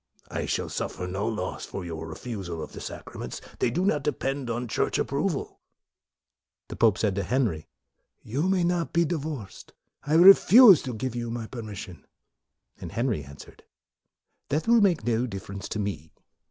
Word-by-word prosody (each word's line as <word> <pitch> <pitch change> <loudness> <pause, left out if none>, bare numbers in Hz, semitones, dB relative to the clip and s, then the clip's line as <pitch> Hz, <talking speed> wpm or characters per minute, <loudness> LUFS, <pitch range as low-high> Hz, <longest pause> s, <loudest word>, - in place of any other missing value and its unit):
I - - -3
shall - - -1
suffer 90 - -4
no 95 +4 -3
loss 105 -5 -4
by 95 - -6
your 80 -2 -6
refusal 90 -3 -6
of - - -9
the - - -9
sacraments: - - -7 0.2
they - - +2
do 180 +10 -1
not 150 -7 +2
depend 135 -2 -2
on 120 +1 -2
Church 110 - 0
approval.' - - -1
1 - - -26 1.1
The - - -6
pope 110 -3 +3
said 105 -3 +1
to 100 +1 -2
Henry, 115 - -1 0.3
" - - -48
You 150 +8 +1
may 190 -2 +2
not 170 -5 0
be 170 0 +3
divorced. 150 - -5 0.3
I 150 +2 0
refuse 195 - +9
to 125 -3 -4
give 120 +2 -4
you 120 -1 -3
my 115 -1 -4
per 120 +1 -7
mission." 95 -7 -9 0.7
Henry 115 - -2
answered, 70 +1 -13 0.5
" - - -54
That 150 +8 -1
will 235 -1 +5
make 175 - +2
no 120 +1 +1
difference 95 -2 -7
to - - -3
me. 100 -7 -4
120 Hz, 175 wpm, -26 LUFS, 100-150 Hz, 1.1 s, refuse